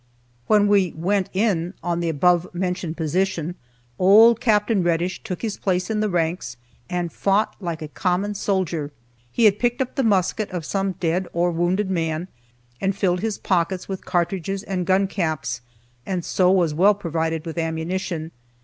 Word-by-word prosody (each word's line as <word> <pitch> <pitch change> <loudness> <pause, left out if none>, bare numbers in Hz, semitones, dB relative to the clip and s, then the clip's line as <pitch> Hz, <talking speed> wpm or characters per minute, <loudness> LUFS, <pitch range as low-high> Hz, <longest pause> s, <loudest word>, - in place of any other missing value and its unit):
When 210 -1 +4
we 200 -4 +3
"went 190 +3 0
in" 190 -3 0
on 175 -1 -1
the 170 -1 -1
above 175 +3 +3
mentioned 180 -2 -2
position 175 +1 -1 0.5
old 220 +5 +7
Capt. 210 -2 +2
Reddish 175 -1 0
took 180 +3 -6
his 220 -3 -2
place 185 +1 -1
in 215 - 0
the 215 0 +1
ranks, 165 -8 -1 0.3
and 175 -3 -2
fought 200 +2 +1
like 170 -5 -4
a - - -5
common 185 +5 -1
soldier. 180 -7 -1 0.4
He 235 - +2
had 205 -1 +5
picked 240 0 +1
up 260 -2 -2
the 275 - 0
musket 205 0 +1
of 180 -4 -5
some 195 +1 -1
dead 180 0 -1
or 175 +1 +1
wounded 180 +4 0
man, 165 0 -2 0.5
and 195 0 0
filled 180 -2 +1
his 215 +1 -2
pockets 180 0 0
with 190 -1 -5
cartridges 190 +2 -1
and 185 -4 -3
gun 190 +1 +3
caps, 160 -9 -2 0.4
and 180 +1 -3
so 180 -1 +2
was 180 -5 +3
well 195 +6 +4
provided 165 -3 -2
with 165 0 -4
ammunition. 165 0 -3
180 Hz, 165 wpm, -23 LUFS, 170-195 Hz, 0.5 s, old